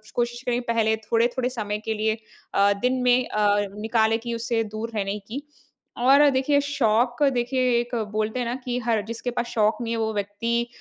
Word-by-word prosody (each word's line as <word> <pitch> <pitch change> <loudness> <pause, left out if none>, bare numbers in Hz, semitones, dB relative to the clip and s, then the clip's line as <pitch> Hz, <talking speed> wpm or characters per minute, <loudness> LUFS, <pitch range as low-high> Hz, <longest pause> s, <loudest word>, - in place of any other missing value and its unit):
कोशिश 240 0 -1
करिए 245 -1 +1
पहले 220 -1 +2
थोड़े-थोड़े 240 +3 0
समय 210 -4 -3
के 220 - 0
लिए 220 0 0 0.4
अ, 200 +1 +4
दिन 255 +1 +1
में 250 0 +3
अ, 205 -1 +2 0.2
निकालें 225 0 +2
कि 235 0 -5
उसे 230 0 -1
दूर 215 +1 -5
रहने 200 0 -1
की। 220 +8 -7 0.6
और 275 +4 +6
देखिए 275 +2 +2
शौक 245 -2 +1
देखिए 250 +1 0 0.2
एक 240 +1 -4 0.2
बोलते 215 +3 -1
हैं 245 - -1
ना 240 - -2
कि 245 -1 -1
हर 225 -3 +2
जिसके 230 +2 -4
पास 240 - -2
शौक 215 -1 +1
नहीं 230 -1 -2
है 230 - -2
वो 220 0 -1
व्यक्ति 230 +4 -1
230 Hz, 190 wpm, -24 LUFS, 215-245 Hz, 0.6 s, और